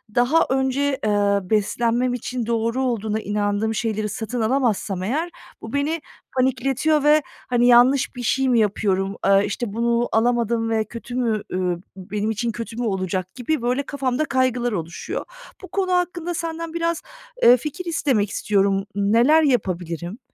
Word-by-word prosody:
daha 250 +7 +4
önce, 265 +1 0
ııı, 200 -2 +1
beslenmem 235 +4 +1
için 245 0 -3
doğru 230 +3 0
olduğuna 220 -4 -1
inandığım 205 +1 -1
şeyleri 215 -2 -1
satın 235 +2 -4
alamazsam 220 -6 0
eğer 300 - -1 0.3
bu - - -8
beni 295 +3 0 0.4
panikletiyor 265 +4 +1
ve, 300 +1 +5 0.3
hani, 245 -1 +3
"Yanlış 245 +3 +5
bir 245 - -6
şey 265 +3 +1
mi 240 -2 +4
yapıyorum, 195 -2 0
aaa, 195 0 +5
işte, 210 +1 -3
bunu 235 +1 +1
alamadım 230 0 +1
ve 220 -1 +1
kötü 235 +2 -8
mü, 230 -4 0
ü 180 -1 0 0.2
benim 205 +3 -3
için 230 +2 -2
kötü 230 0 -7
mü 245 - -2
olacak?" 185 -2 -2
gibi 255 +3 -1
böyle 250 +4 0
kafamda 270 0 -1
kaygılar 255 -3 +1
oluşuyor. 170 -4 -4 0.4
Bu - - -7
konu 375 -1 -1
hakkında 350 -1 -1
senden 330 0 -4
biraz, 335 -1 -1 0.4
eee, 245 +1 +8
fikir 305 +8 -6
istemek 270 - +1
istiyorum. 195 -2 +1
N 200 0 +1
neler 280 +8 +5
yapabilirim? 180 - -1
235 Hz, 155 wpm, -22 LUFS, 210-265 Hz, 0.4 s, eee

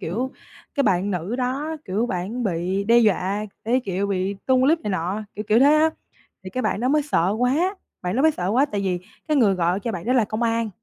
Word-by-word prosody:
Kiểu, 240 +11 -3 0.4
cái 280 - +2
bạn 190 +2 +1
nữ 185 +5 -3
đó, 270 +5 -2
kiểu, 210 +6 -1
bản 205 +6 -3
bị 185 +1 -1
đe 235 +2 +5
dọa 205 -2 +1 0.2
cái, 245 +4 +2
kiểu, 195 +1 -1
bị 195 0 -1
tung 260 -1 +4
clip 320 +5 +3
này 210 - -3
nọ, 185 +4 -2
kiểu 210 - -4
kiểu 220 +2 +5
thế 285 +3 +6
á. 315 +1 +4 0.5
Thì 185 - -7
cái 255 - -3
bạn 205 - -1
đó 250 - 0
mới 300 +2 +3
sợ 180 - +1
quá 305 +11 +1 0.3
bạn 180 +3 -2
đó 265 - +2
mới 315 0 +5
sợ 180 -9 -3
quá 260 +7 +3
tại 205 -7 -3
vì 180 -2 -1 0.3
cái 305 -2 +2
người 210 -6 +4
gọi 180 +1 0
cho 230 +3 -3
bạn 180 0 -6
đó 250 - +2
là 245 -4 +3
công 215 +2 -4
an, 230 -1 +1
215 Hz, 245 wpm, -23 LUFS, 190-255 Hz, 0.5 s, thế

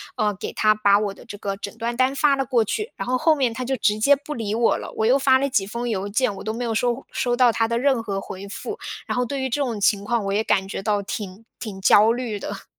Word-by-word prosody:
呃， 210 -1 +1
给 - - -6
他 215 0 +3
把 200 -1 +4
我 205 -2 -2
的 - - -15
这 205 - -8
个 195 -1 -4
诊 200 +1 -7
断 235 +1 -3
单 260 +2 +2
发 285 0 +3
了 270 -1 -1
过 240 -3 +2
去， 425 - -3
然 - - -5
后 255 0 +1
后 315 +3 +3
面 255 -5 0
他 255 +1 -4
就 265 - 0
直 210 -2 +1
接 280 +6 +5
不 290 +2 -7
理 220 -5 -3
我 235 0 +2
了， - - -7
我 220 - 0
又 255 +4 +5
发 265 -1 +5
了 275 +1 0
几 200 -7 +1
封 235 +2 -4
邮 200 -2 -2
件， 215 +2 0
我 - - -8
都 220 +1 -3
没 245 - -4
有 230 -2 -1
收 245 +3 -1
收 245 -1 0
到 245 -1 +5
他 225 0 +1
的 235 - -1
任 260 -1 +2
何 200 -3 -3
回 195 +1 -8
复。 420 - -6 0.3
然 - - -3
后 250 - +1
对 275 +2 -3
于 265 - -1
这 285 +4 -1
种 235 -6 -2
情 200 0 +2
况， 235 -1 0
我 195 - -1
也 210 +2 +1
感 195 -3 +1
觉 195 - -5
到 205 0 0
挺 200 +1 -6 0.2
挺 195 -4 -7
焦 210 +3 +6
虑 235 -3 -3
的。 200 0 -7
230 Hz, 310 characters per minute, -23 LUFS, 205-255 Hz, 0.3 s, 焦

